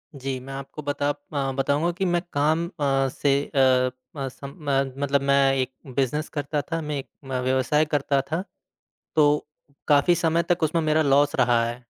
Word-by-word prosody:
जी, 135 Hz, -1 st, -4 dB
मैं 135 Hz, +2 st, -9 dB
आपको 135 Hz, +2 st, -7 dB
बता 145 Hz, 0 st, -1 dB
अ, 145 Hz, -2 st, -3 dB
बताऊँगा 145 Hz, +5 st, +1 dB
कि 195 Hz, -, 0 dB
मैं 175 Hz, -1 st, +1 dB
काम 155 Hz, +4 st, +2 dB
अ, 135 Hz, -5 st, 0 dB
से 140 Hz, +2 st, 0 dB, 0.2 s
अ 130 Hz, -1 st, +4 dB, 0.3 s
अ, 135 Hz, -, -2 dB
सम 140 Hz, +3 st, -10 dB
म 135 Hz, -1 st, +1 dB
मतलब 140 Hz, 0 st, +2 dB
मैं 140 Hz, -1 st, +3 dB
एक 130 Hz, 0 st, -1 dB, 0.2 s
बिज़नेस 140 Hz, +3 st, 0 dB
करता 145 Hz, 0 st, -2 dB
था, 165 Hz, +1 st, -4 dB
मैं 150 Hz, -1 st, -3 dB
एक -, -, -8 dB, 0.2 s
म 130 Hz, -1 st, -2 dB
व्यवसाय 130 Hz, +4 st, +2 dB
करता 140 Hz, -2 st, +1 dB
था 170 Hz, +4 st, -1 dB, 0.7 s
तो 150 Hz, -1 st, +3 dB, 0.4 s
काफ़ी 145 Hz, +4 st, +5 dB
समय 170 Hz, 0 st, +1 dB
तक 175 Hz, -, -2 dB
उसमें 160 Hz, +2 st, +2 dB
मेरा 155 Hz, 0 st, +2 dB
लॉस 145 Hz, +1 st, +3 dB
रहा 120 Hz, -2 st, +3 dB
है। 120 Hz, +1 st, -6 dB
140 Hz, 180 wpm, -24 LUFS, 135-150 Hz, 0.7 s, काफ़ी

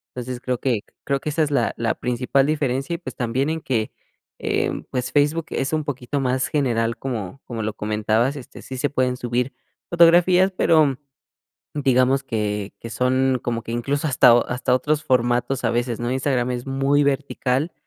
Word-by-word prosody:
entonces, 125 Hz, 0 st, -5 dB
creo 125 Hz, -1 st, -1 dB
que 125 Hz, -4 st, 0 dB, 0.2 s
creo 140 Hz, -1 st, 0 dB
que 155 Hz, -, -4 dB
esa 155 Hz, +2 st, +1 dB
es 150 Hz, -, -2 dB
la 140 Hz, -, +1 dB
la 115 Hz, -1 st, 0 dB
principal 125 Hz, +3 st, 0 dB
diferencia 140 Hz, 0 st, -1 dB
y, -, -, -4 dB
pues, 170 Hz, -, -8 dB
también 130 Hz, +4 st, -1 dB
en 160 Hz, 0 st, -3 dB
que, 115 Hz, -6 st, -1 dB, 0.5 s
em, -, -, -1 dB
pues, 125 Hz, -1 st, -3 dB
Facebook 150 Hz, +3 st, +2 dB
es 135 Hz, +3 st, -2 dB
un 155 Hz, -1 st, 0 dB
poquito 140 Hz, -1 st, -3 dB
más 130 Hz, 0 st, 0 dB
general, 115 Hz, -5 st, 0 dB
como 120 Hz, -2 st, -5 dB
como 115 Hz, -2 st, -5 dB
lo 110 Hz, 0 st, -2 dB
comentabas, 110 Hz, +5 st, 0 dB
este, 135 Hz, -4 st, -10 dB
sí 130 Hz, -, -7 dB
se 145 Hz, +3 st, 0 dB
pueden 130 Hz, -2 st, 0 dB
subir 125 Hz, +1 st, -2 dB, 0.4 s
fotografías, 175 Hz, +2 st, +5 dB
pero, 150 Hz, -5 st, +4 dB, 0.8 s
digamos 135 Hz, -1 st, +2 dB
que 105 Hz, -5 st, -3 dB
que 115 Hz, -, -8 dB
son 130 Hz, +2 st, +1 dB
como 115 Hz, -1 st, -2 dB
que 115 Hz, -, -8 dB
incluso 140 Hz, +6 st, -1 dB
hasta 125 Hz, -2 st, +6 dB, 0.2 s
hasta 125 Hz, 0 st, 0 dB
otros 150 Hz, +4 st, 0 dB
formatos 125 Hz, +1 st, +1 dB
a 115 Hz, -, +3 dB
veces, 120 Hz, 0 st, -1 dB
¿no? 120 Hz, 0 st, -2 dB
Instagram 130 Hz, -1 st, 0 dB
es 125 Hz, 0 st, -4 dB
muy 135 Hz, +2 st, +2 dB
vertical, 140 Hz, +1 st, 0 dB
130 Hz, 180 wpm, -22 LUFS, 120-140 Hz, 0.8 s, hasta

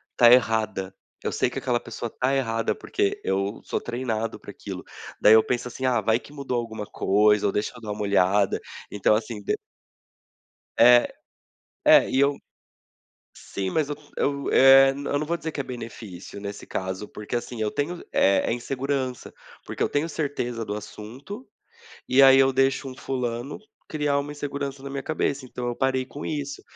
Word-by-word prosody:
tá 120 Hz, -1 st, +7 dB
errada, 110 Hz, -5 st, +2 dB, 0.3 s
eu -, -, -1 dB
sei -, -, +1 dB
que -, -, -8 dB
aquela 120 Hz, -1 st, 0 dB
pessoa 115 Hz, 0 st, -6 dB
tá 130 Hz, +2 st, 0 dB
errada 115 Hz, -4 st, 0 dB
porque, 100 Hz, -, -1 dB
eu 100 Hz, +2 st, -1 dB
sou -, -, -3 dB
treinado 115 Hz, -2 st, -3 dB
para -, -, -10 dB
aquilo. -, -, -8 dB, 0.4 s
Daí 105 Hz, -, +8 dB
eu 110 Hz, 0 st, +7 dB
penso 125 Hz, 0 st, -2 dB
assim: 130 Hz, -, -8 dB
"Ah, 125 Hz, -3 st, +3 dB
vai 110 Hz, +3 st, +2 dB
que 145 Hz, -, -16 dB
mudou 140 Hz, -4 st, -3 dB
alguma 110 Hz, -2 st, -5 dB
coisa" 105 Hz, +1 st, +2 dB
ou -, -, +1 dB
"Deixa 105 Hz, -, -1 dB
eu 120 Hz, -, -12 dB
dar 110 Hz, -, -8 dB
uma 105 Hz, -, -3 dB
molhada", 100 Hz, -1 st, +2 dB, 0.3 s
então, 105 Hz, +1 st, +3 dB
assim, 110 Hz, -1 st, -4 dB
de -, -, -1 dB, 1.2 s
É. 120 Hz, +1 st, +7 dB, 0.8 s
É -, -, +7 dB
e 135 Hz, -, +2 dB
eu 140 Hz, 0 st, +3 dB, 1.0 s
sim 95 Hz, -1 st, -5 dB
mas 155 Hz, -2 st, 0 dB
eu 145 Hz, -, -2 dB, 0.2 s
eu, 140 Hz, -1 st, -1 dB
eh, 135 Hz, +1 st, +8 dB
eu 145 Hz, +1 st, -2 dB
não 150 Hz, -, -2 dB
vou 170 Hz, -, 0 dB
dizer 160 Hz, -1 st, -5 dB
que -, -, -6 dB
é 140 Hz, -, 0 dB
benefício, 110 Hz, -7 st, -8 dB
nesse 100 Hz, 0 st, -7 dB
caso, 95 Hz, +2 st, -4 dB
porque, 105 Hz, +3 st, -6 dB
assim, 120 Hz, -1 st, -4 dB
eu 105 Hz, -, +1 dB
tenho, 170 Hz, +8 st, -3 dB
eh, 100 Hz, -, +4 dB
é -, -, +1 dB
insegurança, 130 Hz, +1 st, -3 dB, 0.3 s
porque -, -, -3 dB
eu -, -, +1 dB
tenho 145 Hz, +3 st, 0 dB
certeza 125 Hz, -7 st, -3 dB
do 105 Hz, -, -4 dB
assunto, 125 Hz, -, -8 dB, 0.6 s
e 130 Hz, +2 st, +5 dB
aí 135 Hz, 0 st, +8 dB
eu 135 Hz, 0 st, +5 dB
deixo 135 Hz, +1 st, +1 dB
um 130 Hz, -, -9 dB
fulano 125 Hz, 0 st, -4 dB, 0.3 s
criar 150 Hz, -2 st, 0 dB
uma 145 Hz, +1 st, -4 dB
insegurança 140 Hz, -1 st, -5 dB
na 140 Hz, -, -6 dB
minha 135 Hz, 0 st, -4 dB
cabeça, 145 Hz, -3 st, -1 dB
então 125 Hz, 0 st, -6 dB
eu 120 Hz, -, -3 dB
parei 130 Hz, -1 st, +1 dB
com 145 Hz, +3 st, -9 dB
isso, 140 Hz, -2 st, -4 dB
125 Hz, 185 wpm, -25 LUFS, 110-140 Hz, 1.2 s, Daí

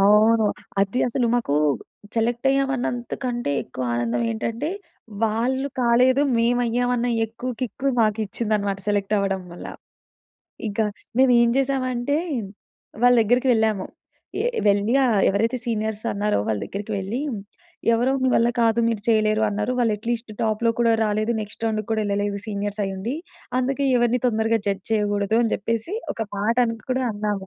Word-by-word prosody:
అవును. 215 Hz, +2 st, +5 dB, 0.3 s
అది 200 Hz, +5 st, +1 dB
అసలు 240 Hz, 0 st, 0 dB
మాకూ 230 Hz, -12 st, 0 dB, 0.6 s
సెలక్టయ్యాం 270 Hz, +4 st, +1 dB
అన్నంతకంటే 245 Hz, -, -3 dB
ఎక్కువ 130 Hz, 0 st, -7 dB
ఆనందం 120 Hz, 0 st, 0 dB
ఏంటంటే, 230 Hz, -, -3 dB, 0.6 s
వాళ్ళు 250 Hz, +5 st, 0 dB
కాలేదు, 250 Hz, +3 st, +4 dB
మేవయ్యామన్న 245 Hz, +1 st, +1 dB, 0.2 s
ఎక్కువు 235 Hz, +3 st, -5 dB
కిక్కు 255 Hz, +3 st, -2 dB
మాకిచ్చిందనమాట 215 Hz, -2 st, 0 dB
సెలెక్ట్ 205 Hz, 0 st, +1 dB
అవ్వడం 195 Hz, -1 st, -1 dB
వల్ల. 175 Hz, -, -8 dB, 1.0 s
ఇకా 210 Hz, +1 st, 0 dB, 0.3 s
మేమేం 240 Hz, -3 st, +5 dB
చేశామంటే, 265 Hz, 0 st, 0 dB, 0.9 s
వాళ్ళ 245 Hz, 0 st, +6 dB
దగ్గరకి 245 Hz, +4 st, +2 dB
వెళ్ళాము. 220 Hz, -4 st, +1 dB, 0.5 s
ఏ -, -, +2 dB, 0.2 s
వెళ్ళి 205 Hz, +3 st, +3 dB
ఆహ్, 220 Hz, -5 st, +3 dB
ఎవరైతే 225 Hz, +5 st, +1 dB
సీనియర్స్ 220 Hz, -2 st, -2 dB
అన్నారో 210 Hz, +1 st, 0 dB
వాళ్ళ 105 Hz, -2 st, 0 dB
దగ్గరికి 205 Hz, +2 st, -5 dB
వెళ్ళీ, 205 Hz, +7 st, -3 dB, 0.7 s
ఎవరో 245 Hz, +3 st, +2 dB
మీ -, -, +4 dB
వల్ల 235 Hz, +1 st, +4 dB
కాదు, 230 Hz, 0 st, +3 dB
మీరు 225 Hz, -3 st, -1 dB
చెయ్యలేరు 215 Hz, -1 st, +3 dB
అన్నారు. 210 Hz, +4 st, -1 dB
వాళ్ళు 230 Hz, -3 st, +2 dB
ఎట్ 220 Hz, +3 st, -16 dB
లీస్ట్ 230 Hz, -1 st, -3 dB
టాప్‌లో 225 Hz, +1 st, +1 dB
కూడా 230 Hz, -1 st, +4 dB
రాలేదు. 215 Hz, +2 st, 0 dB
నెక్స్ట్ 210 Hz, +2 st, -6 dB
రౌండుకు 215 Hz, -2 st, -2 dB
కూడా 220 Hz, -1 st, +1 dB
యెళ్ళలేదు 205 Hz, 0 st, -1 dB
సీనియర్సయ్యుండి. 205 Hz, +1 st, -3 dB, 0.4 s
అందుకే 270 Hz, +2 st, 0 dB
ఎవరిని 240 Hz, +1 st, +2 dB
తొందరగా 225 Hz, -1 st, +1 dB
జడ్జ్ 200 Hz, -1 st, -1 dB
చెయ్యకూడదు 205 Hz, -1 st, +1 dB
అని 230 Hz, -, +1 dB
చెప్పేసి 230 Hz, -, -2 dB, 0.2 s
ఒక 225 Hz, -, -3 dB
మాటను 230 Hz, +3 st, +1 dB
కూడా 260 Hz, +1 st, +1 dB
అన్నాము. 205 Hz, -2 st, -3 dB
225 Hz, 135 wpm, -23 LUFS, 205-245 Hz, 1.0 s, వాళ్ళ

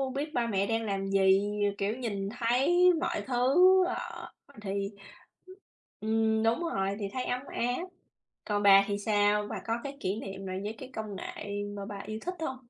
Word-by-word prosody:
biết 300 Hz, +3 st, -3 dB
ba 235 Hz, -1 st, 0 dB
mẹ 200 Hz, -3 st, +1 dB
đang 225 Hz, 0 st, 0 dB
làm 195 Hz, -2 st, -2 dB
gì, 195 Hz, 0 st, +4 dB, 0.3 s
r -, -, -12 dB
kiểu, 205 Hz, +2 st, -1 dB
nhìn 200 Hz, -6 st, -3 dB
thấy 285 Hz, +10 st, +4 dB
mọi 280 Hz, -, -1 dB
thứ, 255 Hz, +3 st, +2 dB, 0.3 s
ờ, 370 Hz, -, -5 dB, 0.3 s
thì 200 Hz, -1 st, -2 dB, 1.1 s
ừm, 220 Hz, 0 st, +1 dB
đúng 225 Hz, +6 st, +2 dB, 0.2 s
rồi, 195 Hz, 0 st, 0 dB
thì 205 Hz, -, -2 dB
thấy 255 Hz, -1 st, -2 dB
ấm 250 Hz, +1 st, -1 dB
áp. 245 Hz, +5 st, -1 dB, 0.6 s
Còn 205 Hz, -1 st, -1 dB
bà 195 Hz, -1 st, +8 dB
thì 200 Hz, -1 st, -2 dB
sao? 205 Hz, 0 st, +2 dB
Bà -, -, -3 dB
có 225 Hz, -, +1 dB
cái 280 Hz, 0 st, -6 dB
kỷ 195 Hz, +4 st, -2 dB
niệm 195 Hz, 0 st, -7 dB
nào 185 Hz, 0 st, -4 dB
với 210 Hz, +2 st, -3 dB
cái 260 Hz, 0 st, -9 dB
công 215 Hz, -2 st, -5 dB
nghệ 205 Hz, +1 st, -5 dB
mà 200 Hz, -, -5 dB
bà 205 Hz, -1 st, -6 dB
yêu 215 Hz, 0 st, -4 dB
thích 360 Hz, -, -2 dB
hông? 265 Hz, -5 st, -3 dB
215 Hz, 190 wpm, -29 LUFS, 200-245 Hz, 1.1 s, bà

